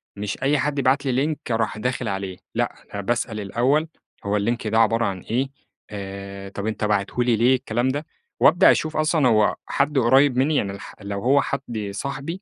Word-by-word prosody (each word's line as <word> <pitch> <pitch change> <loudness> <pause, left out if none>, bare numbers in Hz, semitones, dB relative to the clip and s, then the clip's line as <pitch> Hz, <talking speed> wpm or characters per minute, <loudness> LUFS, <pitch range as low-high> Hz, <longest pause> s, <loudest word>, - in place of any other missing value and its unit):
مش 105 0 -5
أي 145 +1 +3
حد 140 +2 -1
يبعت 135 +2 +2
لي 135 - +1
لينك 145 +2 -1
أروح 110 -1 0
داخل 125 +1 -2
عليه، 95 -2 -4 0.2
لأ، - - 0 0.2
أنا 100 - -3
باسأل 115 +1 -1
الأول 125 +10 +1 0.4
هو 100 +1 +1
اللينك 115 +3 -1
ده 110 +1 +2
عبارة 115 +1 +3
عن 95 -2 -2
إيه؟ 125 +8 -2 0.4
آآ 100 -1 -7
طب 100 +1 -6
أنت 110 -1 -3
باعتُه 105 +3 0
لي 120 -1 +2
ليه؟ 120 +4 +4
الكلام 120 0 -1
ده، 145 +4 -2 0.3
وأبدأ - - +6
أشوف 155 0 -1
أصلًا 155 -2 +2
هو 110 -3 +3
حد 145 +1 0
قريب 130 +2 +4
مني، 145 +4 +2
يعني 100 -7 0
الح 100 0 -9
لو 100 0 -4
هو 140 +5 +4
حد 115 -7 -4
صاحبي 140 - -5
120 Hz, 195 wpm, -23 LUFS, 105-135 Hz, 0.4 s, وأبدأ